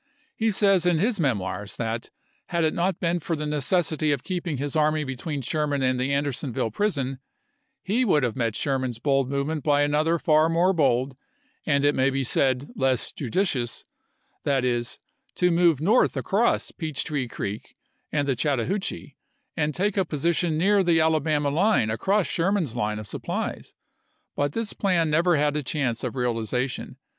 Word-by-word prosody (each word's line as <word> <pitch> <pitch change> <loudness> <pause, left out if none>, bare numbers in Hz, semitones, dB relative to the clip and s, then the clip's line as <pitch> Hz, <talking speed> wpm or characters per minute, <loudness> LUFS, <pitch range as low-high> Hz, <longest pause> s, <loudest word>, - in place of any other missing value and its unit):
He 225 0 +1
says 195 -3 +3
in 175 -2 +3
his 210 +5 +1
memoirs 105 - -1
that, 115 -1 -3 0.4
had 170 -1 0
it 155 - +2
not 180 +1 0
been 175 0 0
for 165 +1 -2
the 150 0 -4
necessity 150 +1 0
of 140 -3 -1
keeping 175 -5 -3
his 145 +2 -3
army 155 0 +2
between 140 +1 -4
Sher 150 +5 -1
man 140 -2 -1
and 130 -1 +1
the 130 +2 0
Andersonville 140 -5 -1
prison, 135 - -1 0.6
he 225 +6 +1
would 155 - +3
have 120 -3 -1
met 115 -4 -1
Sherman's 130 -4 -1
bold 135 +1 +1
movement 140 +2 -2
by 145 -1 +3
another 155 +3 +2
far 155 0 +3
more 175 +3 +3
bold 135 -4 +1 0.3
— 290 +1 -40
and 140 -2 +2
it 145 - +4
may 130 +1 +2
be 135 0 -1
said, 130 +2 +1
less 130 -2 0
judicious 130 - -1 0.3
— - - -41
that 135 -3 +1
is, 120 -1 -1 0.4
to 180 0 +2
move 170 -4 +3
north 210 +11 +3
across 220 +5 +1
Peach 155 -5 -4
Tree 145 -5 -2
Creek 105 -2 -6 0.4
and 145 -1 0
the 135 - +1
Chattahoochee 145 - -2 0.4
and 150 -2 0
take 205 +2 0
a 190 - +4
position 165 +1 0
near 200 +4 +3
the 170 -3 +3
Ala 160 -1 +3
bama 145 -1 0
line 180 - +2
across 190 - +1
Sherman's 175 - 0
line 105 -2 -1
of 105 - -6
supplies; - - -4 0.6
but 145 0 -1
this 230 -2 -3
plan 170 -5 +1
never 170 +3 +3
had 145 0 +1
a 150 - 0
chance 130 -4 -2
of - - -3
realization. 125 +1 -2
150 Hz, 175 wpm, -25 LUFS, 130-170 Hz, 0.6 s, it